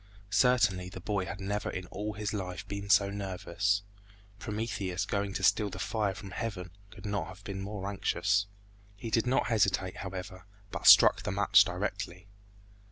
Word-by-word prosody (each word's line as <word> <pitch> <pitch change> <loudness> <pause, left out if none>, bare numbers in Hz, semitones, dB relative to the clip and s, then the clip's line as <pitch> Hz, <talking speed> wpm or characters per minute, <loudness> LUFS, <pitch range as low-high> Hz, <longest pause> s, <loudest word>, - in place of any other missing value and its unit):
Certainly 105 -5 +3
the 95 - -8
boy 100 0 -2
had 90 +1 -6
never 100 +2 -2
in 90 - -5
all 105 +2 -4
his 105 0 -3
life 90 -3 -5
been 100 0 -5
so 100 -1 +5
nervous. 100 0 -1 0.6
Prometheus 100 -4 -3
going 100 -1 -2
to - - -4
steal 105 -2 +3
the 95 - -8
fire 105 -1 -1
from 105 -4 -9
heaven 95 -7 -5 0.2
could 105 -2 -13
not 100 -1 -2
have 95 +2 -12
been 95 -1 -5
more 100 -1 -5
anxious. 100 0 0 0.5
He 110 +3 -7
did 115 +2 +2
not 130 - +2
hesitate, 95 -5 +1
however, 95 0 -7 0.2
but - - -2
struck - - +8
the - - -3
match 100 +1 +5
directly. 95 0 -4
100 Hz, 165 wpm, -30 LUFS, 95-105 Hz, 0.6 s, struck